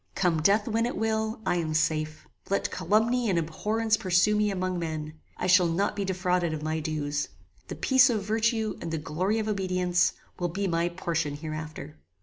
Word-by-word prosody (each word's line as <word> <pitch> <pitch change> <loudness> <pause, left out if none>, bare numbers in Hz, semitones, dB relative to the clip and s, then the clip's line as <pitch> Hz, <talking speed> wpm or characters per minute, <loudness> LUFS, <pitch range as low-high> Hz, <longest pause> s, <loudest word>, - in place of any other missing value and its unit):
"Come 175 -4 +1
death 205 +6 +3
when 230 +1 +1
it 245 - -4
will, 220 0 -1
I 175 - +1
am 160 -2 -1
safe. 155 -1 -1 0.2
Let 200 - 0
calumny 230 +3 +1
and 185 - +2
abhorrence 215 +7 0
pursue 185 +3 +3
me 210 0 +2
among 185 -2 -2
men; 155 -2 -5 0.2
I - - -3
shall 180 -1 +5
not 180 +5 0
be 200 - -2
defrauded 180 -3 0
of 150 - -6
my 155 +1 -1
dues. 150 -2 -2 0.4
The - - -5
peace 260 -1 +5
of 215 -4 0
virtue, 220 +1 0
and - - -4
the 160 - -2
glory 180 +8 -1
of 220 -1 -1
obedience, 185 -3 +1 0.3
will 175 -1 0
be 195 +4 -2
my 170 0 +1
portion 165 -4 -2
hereafter." 155 0 -7
180 Hz, 185 wpm, -27 LUFS, 160-210 Hz, 0.4 s, shall